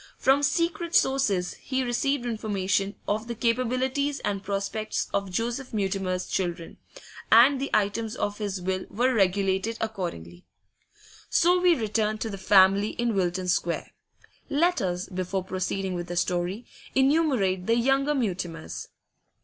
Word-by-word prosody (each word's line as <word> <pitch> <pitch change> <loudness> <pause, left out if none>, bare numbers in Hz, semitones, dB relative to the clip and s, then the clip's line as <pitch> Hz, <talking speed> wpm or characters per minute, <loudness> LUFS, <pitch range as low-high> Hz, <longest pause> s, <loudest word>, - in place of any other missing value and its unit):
From 270 +2 +3
secret 335 +3 0
sources 215 - +2
he 260 -1 -1
received 250 +2 0
information 200 -3 -1
of 215 +2 -1
the 235 - -4
capabilities 255 +4 0
and 200 -1 -2
prospects 200 +2 -2
of 200 -1 -1
Joseph 235 +6 -3
Mutimer's 190 -2 -1
children, 175 -3 -3 0.5
and 260 +4 +7
the 275 - -2
items 215 +2 0
of 205 +1 -3
his 200 -3 -3
will 185 +1 -3
were 250 +5 +1
regulated 195 +1 +1
accordingly. 170 - -5 0.9
So 355 +2 +3
we 355 -2 +5
return 215 -2 -1
to 220 0 -4
the 195 - -6
family 195 +1 +4
in 235 -1 -1
Wilton 185 -1 -1
Square. 180 +2 -1 0.6
Let 345 +5 +2
us, 180 -1 -2
before 185 0 -3
proceeding 185 +1 -3
with 175 -1 -4
the 175 - -5
story, 180 +6 -1 0.3
enumerate 265 - +2
the 230 - +4
younger 270 +4 +2
Mutimers. 180 - -3
210 Hz, 135 wpm, -26 LUFS, 190-255 Hz, 0.9 s, and